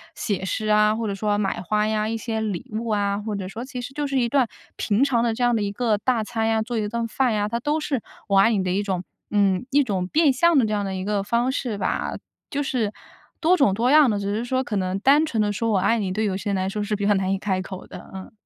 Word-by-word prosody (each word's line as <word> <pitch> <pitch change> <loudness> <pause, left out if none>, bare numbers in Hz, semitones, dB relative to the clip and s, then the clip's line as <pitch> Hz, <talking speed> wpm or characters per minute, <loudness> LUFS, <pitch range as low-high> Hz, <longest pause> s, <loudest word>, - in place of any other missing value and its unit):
写 195 -4 -2
诗 215 +3 -2
啊， 210 0 +4
或 225 0 -3
者 200 - -2
说 205 +1 0
买 200 -2 -1
花 210 +3 0
呀， 215 0 0
一 225 - -2
些 225 0 -3
礼 205 -6 -3
物 225 +2 -3
啊， 200 -1 +1
或 210 0 -4
者 190 -2 -4
说 225 +5 -6
其 255 -2 -6
实 270 +3 -7
就 290 0 -2
是 275 -1 -1
一 235 -1 +1
段 260 -3 +3 0.3
平 215 +6 +1
常 240 -4 +2
的 230 -1 +1
这 245 +2 -2
样 240 -1 +3
的 215 - 0
一 200 0 -1
个 220 -1 +1
大 225 +1 0
餐 225 0 -2
呀， 220 0 +2
做 235 +1 -3
一 210 -1 -1
顿 230 +1 -2
饭 250 0 +1
呀， 205 0 0
它 235 +1 -2
都 295 +5 0
是 275 -6 -2 0.3
“我 195 -1 +4
爱 225 +4 +5
你” 195 -4 +1
的 180 - -1
一 200 +2 +1
种， 185 -3 -2 0.3
嗯， 200 0 +2
一 285 +1 +4
种 190 -7 -2
变 305 - +4
相 335 +4 +3
的 245 - +4
这 215 - -2
样 205 -1 0
的 190 -1 -3
一 185 - -3
个 205 -1 -1
方 235 +4 +1
式 245 -6 -3
吧， - - -1 0.4
就 285 - -2
是 230 -6 -1 0.5
多 355 +3 +4
种 215 -10 +4
多 235 +5 +1
样 295 -2 +6
的。 205 - 0
只 200 0 -2
是 225 +3 -2
说 260 +1 0
可 215 - -4
能 185 0 -1
单 285 +7 +5
纯 225 -7 -1
地 205 0 +1
说 225 +2 -1
"我 - - +3
爱 230 +5 +2
你"， 195 -3 -2
对 215 +2 -1
有 190 -2 0
些 200 +1 -3
人 - - +1
来 190 0 -1
说 210 +1 -3
是 210 0 -1
比 205 - -2
较 205 - +5
难 190 0 0
以 195 - -1
开 190 -2 -1
口 190 -1 -8
的， - - -11
嗯。 190 0 -8
215 Hz, 310 characters per minute, -23 LUFS, 200-245 Hz, 0.5 s, 样